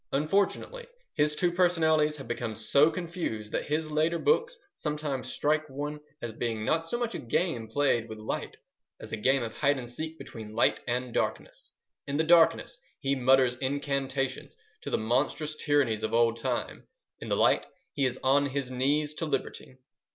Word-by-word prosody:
Unfortunately, 200 Hz, -, 0 dB, 0.3 s
his 150 Hz, -1 st, +1 dB
two 175 Hz, +1 st, +1 dB
personalities 160 Hz, -4 st, +3 dB
have 135 Hz, -4 st, -9 dB
become 120 Hz, -2 st, -3 dB
so 140 Hz, +8 st, +4 dB
confused 165 Hz, -, -4 dB
that -, -, -2 dB
his 155 Hz, +1 st, -1 dB
later 160 Hz, +3 st, +2 dB
books 480 Hz, -, +1 dB, 0.2 s
sometimes 150 Hz, -3 st, -3 dB
strike 155 Hz, +1 st, 0 dB
one 145 Hz, +2 st, -4 dB, 0.2 s
as 115 Hz, -2 st, -4 dB
being 115 Hz, -1 st, -3 dB
not 160 Hz, +6 st, +2 dB
so 165 Hz, +9 st, -3 dB
much 240 Hz, -1 st, -2 dB
a -, -, -4 dB
game 120 Hz, -2 st, -1 dB
played 120 Hz, -2 st, +1 dB
with 110 Hz, -, -7 dB
light 110 Hz, -, -4 dB, 0.4 s
as -, -, -10 dB
a -, -, -1 dB
game 130 Hz, +4 st, +2 dB
of 115 Hz, -1 st, -5 dB
hide 145 Hz, -1 st, +2 dB
and 125 Hz, -2 st, -6 dB
seek 160 Hz, +6 st, -6 dB
between 110 Hz, -6 st, -9 dB
light 115 Hz, -, +3 dB
and 125 Hz, 0 st, -2 dB
darkness. -, -, -3 dB, 0.4 s
In 140 Hz, 0 st, -1 dB
the 160 Hz, -, +3 dB
darkness 165 Hz, 0 st, +4 dB, 0.2 s
he 135 Hz, 0 st, 0 dB
mutters 130 Hz, -1 st, +4 dB
incantations 135 Hz, 0 st, -2 dB, 0.2 s
to -, -, -5 dB
the -, -, +1 dB
monstrous 145 Hz, +7 st, 0 dB
tyrannies 145 Hz, -8 st, +1 dB
of 110 Hz, +1 st, -1 dB
old 115 Hz, 0 st, +3 dB
time: 115 Hz, -, -3 dB, 0.3 s
in -, -, -7 dB
the -, -, +1 dB
light -, -, +3 dB, 0.3 s
he 140 Hz, -, +1 dB
is 125 Hz, 0 st, -4 dB
on 140 Hz, +2 st, +4 dB
his 135 Hz, -1 st, -3 dB
knees 145 Hz, +4 st, +1 dB
to 160 Hz, +1 st, -3 dB
liberty. 135 Hz, -2 st, -4 dB
140 Hz, 175 wpm, -29 LUFS, 120-155 Hz, 0.4 s, so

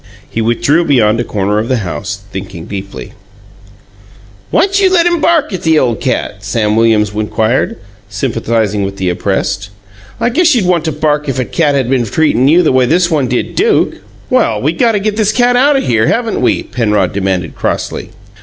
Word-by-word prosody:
He 115 Hz, -, -3 dB
withdrew 120 Hz, +8 st, +1 dB
beyond 115 Hz, -8 st, +2 dB
a -, -, 0 dB
corner 105 Hz, -1 st, -1 dB
of 110 Hz, -, -3 dB
the 130 Hz, -, +1 dB
house, 95 Hz, +3 st, -5 dB
thinking 95 Hz, -4 st, -7 dB
deeply. 100 Hz, -1 st, -7 dB, 1.4 s
"Why'n't 390 Hz, +1 st, +2 dB
you 380 Hz, -1 st, +3 dB
let 345 Hz, -2 st, +3 dB
him 345 Hz, -2 st, +1 dB
bark 330 Hz, -10 st, +2 dB
at 185 Hz, -, -4 dB
the 160 Hz, -1 st, +2 dB
ole 125 Hz, -5 st, +2 dB
cat?" -, -, -3 dB
Sam 105 Hz, -2 st, 0 dB
Williams 110 Hz, -2 st, +2 dB
inquired, 110 Hz, +3 st, -1 dB, 0.3 s
sympathizing 110 Hz, -1 st, -1 dB
with 100 Hz, 0 st, -4 dB
the 95 Hz, -2 st, -1 dB
oppressed. 95 Hz, +2 st, -2 dB, 0.5 s
"I -, -, +1 dB
guess 315 Hz, +3 st, +3 dB
you'd 220 Hz, -6 st, +1 dB
want 175 Hz, -3 st, +1 dB
to 160 Hz, -, 0 dB
bark 150 Hz, -1 st, -1 dB
if 135 Hz, -, -2 dB
a 130 Hz, -, -1 dB
cat 150 Hz, -1 st, 0 dB
had 135 Hz, -3 st, 0 dB
been 125 Hz, -2 st, +1 dB
treatin' 135 Hz, +1 st, +1 dB
you 170 Hz, +5 st, +5 dB
the 155 Hz, -, +2 dB
way 130 Hz, -1 st, +3 dB
this 175 Hz, +4 st, +2 dB
one 145 Hz, -5 st, +1 dB
did 120 Hz, 0 st, -2 dB
Duke." 435 Hz, +3 st, +1 dB, 0.3 s
"Well, 245 Hz, -, +1 dB
we 150 Hz, +8 st, 0 dB
got 230 Hz, +6 st, +2 dB
to 205 Hz, -, +1 dB
get 210 Hz, +1 st, -2 dB
this 215 Hz, -2 st, +2 dB
cat 245 Hz, +2 st, +2 dB
out 280 Hz, +4 st, +4 dB
o' 270 Hz, -, +2 dB
here, 115 Hz, -, +1 dB
haven't 230 Hz, -2 st, -1 dB
we?" 125 Hz, -, +1 dB
Penrod 105 Hz, -5 st, 0 dB
demanded 95 Hz, -4 st, -2 dB
crossly. 95 Hz, -, -3 dB
125 Hz, 195 wpm, -13 LUFS, -, 1.4 s, you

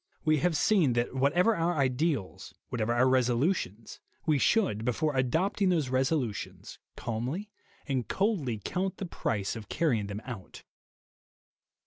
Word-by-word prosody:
We 155 Hz, 0 st, +4 dB
have 160 Hz, +2 st, +1 dB
seen 170 Hz, -, +3 dB
that 120 Hz, 0 st, 0 dB
whatever 170 Hz, -, +3 dB
our 170 Hz, +1 st, 0 dB
ideals, 135 Hz, -, -1 dB
whatever 115 Hz, -2 st, -1 dB
our 120 Hz, +2 st, +4 dB
resolutions, 125 Hz, -, 0 dB, 0.3 s
we 150 Hz, -3 st, +3 dB
should, 130 Hz, -, +2 dB
before 140 Hz, +5 st, 0 dB
adopting 180 Hz, -, +1 dB
those 160 Hz, -7 st, +1 dB
resolutions, 130 Hz, -, -2 dB, 0.2 s
calmly 130 Hz, -, -4 dB, 0.4 s
and 130 Hz, -4 st, -1 dB
coldly 185 Hz, -, 0 dB
count 190 Hz, +1 st, -2 dB
the 195 Hz, -, -4 dB
price 105 Hz, -, -2 dB
of 110 Hz, -2 st, -8 dB
carrying 125 Hz, -11 st, +1 dB
them 100 Hz, +2 st, -6 dB
out. 115 Hz, -8 st, -8 dB
135 Hz, 130 wpm, -29 LUFS, 120-170 Hz, 0.4 s, We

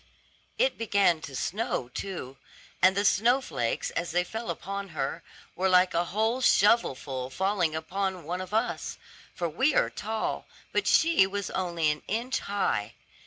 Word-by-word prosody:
It -, -, +1 dB
began 200 Hz, -7 st, +2 dB
to 140 Hz, -, -8 dB
snow 175 Hz, -, -2 dB
too; 135 Hz, -4 st, -6 dB, 0.4 s
and 190 Hz, +1 st, +5 dB
the 200 Hz, -, +2 dB
snow 235 Hz, +6 st, +4 dB
flakes, 120 Hz, -, -2 dB
as 170 Hz, +1 st, -2 dB
they 180 Hz, +2 st, +1 dB
fell 225 Hz, +5 st, -6 dB
upon 200 Hz, 0 st, -4 dB
her, 135 Hz, +5 st, -2 dB, 0.3 s
were 190 Hz, +1 st, +1 dB
like 180 Hz, 0 st, +5 dB
a 170 Hz, +1 st, +1 dB
whole 220 Hz, +7 st, 0 dB
shovelful 135 Hz, -, +2 dB
falling 185 Hz, 0 st, 0 dB
upon 185 Hz, +2 st, -3 dB
one 175 Hz, +4 st, -3 dB
of 185 Hz, -, -7 dB
us, 225 Hz, +3 st, -1 dB, 0.4 s
for 175 Hz, -, -1 dB
we 265 Hz, -, +1 dB
are -, -, +3 dB
tall, 220 Hz, +1 st, -3 dB, 0.2 s
but -, -, 0 dB
she 325 Hz, -12 st, +5 dB
was 200 Hz, 0 st, -4 dB
only 170 Hz, -4 st, 0 dB
an 150 Hz, -, -5 dB
inch 235 Hz, +5 st, -1 dB
high. 195 Hz, -, -1 dB
190 Hz, 160 wpm, -28 LUFS, 165-215 Hz, 0.4 s, and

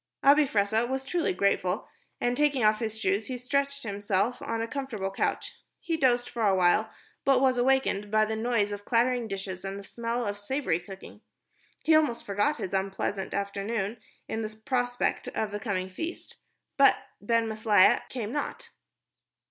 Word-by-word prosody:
Abi 290 Hz, +1 st, +6 dB
Fressah 220 Hz, +2 st, +1 dB
was 265 Hz, 0 st, -2 dB
truly 345 Hz, +2 st, 0 dB
grateful, 185 Hz, 0 st, 0 dB, 0.3 s
and 245 Hz, 0 st, +1 dB
taking 285 Hz, -3 st, +2 dB
off 215 Hz, 0 st, +4 dB
his 220 Hz, -1 st, -3 dB
shoes 200 Hz, 0 st, 0 dB
he 255 Hz, -, -4 dB
stretched 280 Hz, +3 st, -1 dB
himself 205 Hz, +2 st, -1 dB
on 230 Hz, 0 st, -3 dB
a 225 Hz, -, -2 dB
comfortable 230 Hz, -8 st, -4 dB
couch. 195 Hz, -, -2 dB, 0.3 s
He 330 Hz, -, -2 dB
dozed 245 Hz, -5 st, +2 dB
for 235 Hz, -, -5 dB
a 200 Hz, -3 st, +4 dB
while, 185 Hz, +4 st, +3 dB, 0.3 s
but 270 Hz, -2 st, +4 dB
was 260 Hz, -1 st, +3 dB
awakened 245 Hz, -5 st, +2 dB
by 215 Hz, +1 st, +3 dB
the 220 Hz, +1 st, -2 dB
noise 220 Hz, -2 st, 0 dB
of 205 Hz, 0 st, -5 dB
clattering 240 Hz, +1 st, +1 dB
dishes 195 Hz, -2 st, -5 dB
and 195 Hz, 0 st, -4 dB
the 200 Hz, -, -8 dB
smell 235 Hz, +4 st, -3 dB
of 205 Hz, 0 st, -3 dB
savory 225 Hz, -, -1 dB
cooking. 190 Hz, +2 st, -11 dB, 0.6 s
He 320 Hz, -, +4 dB
almost 300 Hz, -7 st, +2 dB
forgot 205 Hz, +10 st, +1 dB
his 185 Hz, -, -5 dB
unpleasant 195 Hz, 0 st, -2 dB
afternoon 200 Hz, +2 st, -2 dB, 0.3 s
in 220 Hz, -, -3 dB
the 215 Hz, 0 st, -6 dB
prospect 245 Hz, -1 st, 0 dB
of 215 Hz, -2 st, -2 dB
the 205 Hz, -, -4 dB
coming 195 Hz, -5 st, -2 dB
feast, 320 Hz, -, -7 dB, 0.4 s
but 275 Hz, 0 st, +6 dB, 0.2 s
Ben 230 Hz, +2 st, +1 dB
Maslia 215 Hz, -3 st, +4 dB
came 230 Hz, -4 st, -4 dB
not. 290 Hz, +2 st, -4 dB
220 Hz, 170 wpm, -28 LUFS, 200-255 Hz, 0.6 s, Abi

